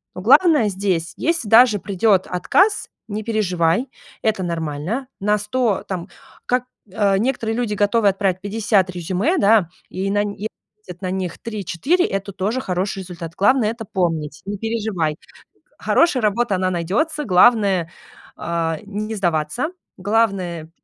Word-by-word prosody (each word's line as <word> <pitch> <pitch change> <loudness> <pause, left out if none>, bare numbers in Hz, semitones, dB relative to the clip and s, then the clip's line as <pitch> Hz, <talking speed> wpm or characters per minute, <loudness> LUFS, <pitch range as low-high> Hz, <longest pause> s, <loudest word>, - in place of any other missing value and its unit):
Но - - -6
главное 310 - +5
здесь, 185 -3 -1
если 330 -8 -1
даже 225 0 +6
придет 195 0 +2
отказ, 380 - +2 0.2
не 215 0 -4
переживай, 190 0 +1 0.4
это 220 -3 +1
нормально. 170 - -3
На 210 +2 +2
100, 210 -1 -1
там, 185 -1 -5 0.4
как, 250 0 +1 0.3
а, 200 -1 +2
некоторые 225 -2 -1
люди 235 -4 -1
готовы 205 +1 +2
отправить 190 -2 -1
50 205 -2 +1
резюме, 185 - -1
да, 205 - +4 0.2
и 190 +1 -3
на 205 +1 +2
е 205 +1 -4 0.4
будет 180 +1 -9
на 185 -1 -3
них 185 -2 -3
3-4, 230 - 0
это 195 +1 -3
тоже 210 +8 -2
хороший 190 -1 -2
результат. 175 -3 -8
Главное 225 +1 +3
это 230 -1 -7
помнить, 165 -6 -2
не 200 0 -4
переживай. 215 -8 -1
Э, - - -14 0.6
хорошая 285 -8 +2
работа, 210 0 +1
она 185 0 0
найдётся. 220 - -1
Главное, 195 -3 +4 0.5
а, 165 -1 -2
не 215 +2 -4
сдаваться. 175 - -1 0.3
Главное, 190 -6 0
200 Hz, 140 wpm, -20 LUFS, 180-225 Hz, 0.6 s, даже